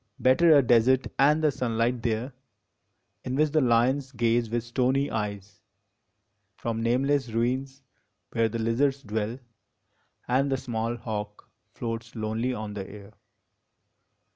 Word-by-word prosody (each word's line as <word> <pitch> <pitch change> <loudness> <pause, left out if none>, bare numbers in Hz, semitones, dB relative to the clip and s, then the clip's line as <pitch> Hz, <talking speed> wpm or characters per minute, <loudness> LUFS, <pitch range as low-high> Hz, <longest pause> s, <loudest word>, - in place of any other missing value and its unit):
Better 150 +5 +5
a 140 - +5
desert 125 +2 +4
and 150 +3 +4
the 155 - +4
sunlight 120 -1 -1
there, 115 +3 -2 0.9
In 125 - -3
which 150 +1 +2
the 155 0 +3
lions 130 +3 +2
gaze 115 -1 +1
with 120 0 -1
stony 130 +3 0
eyes 105 -2 -5 1.0
From 115 -1 -3
nameless 130 +3 +1
ruins 130 +4 -2 0.5
where 115 -1 +1
the 115 - -4
lizards 130 +5 0
dwell, 110 +2 -3 0.9
And 135 +3 +1
the 135 - +1
small 120 -2 -3
hawk 105 -3 -6 0.3
floats 115 0 -5
lonely 110 +3 -2
on 110 -4 -5
the 100 -2 -6
air. 100 0 -12
120 Hz, 130 wpm, -27 LUFS, 110-130 Hz, 1.0 s, Better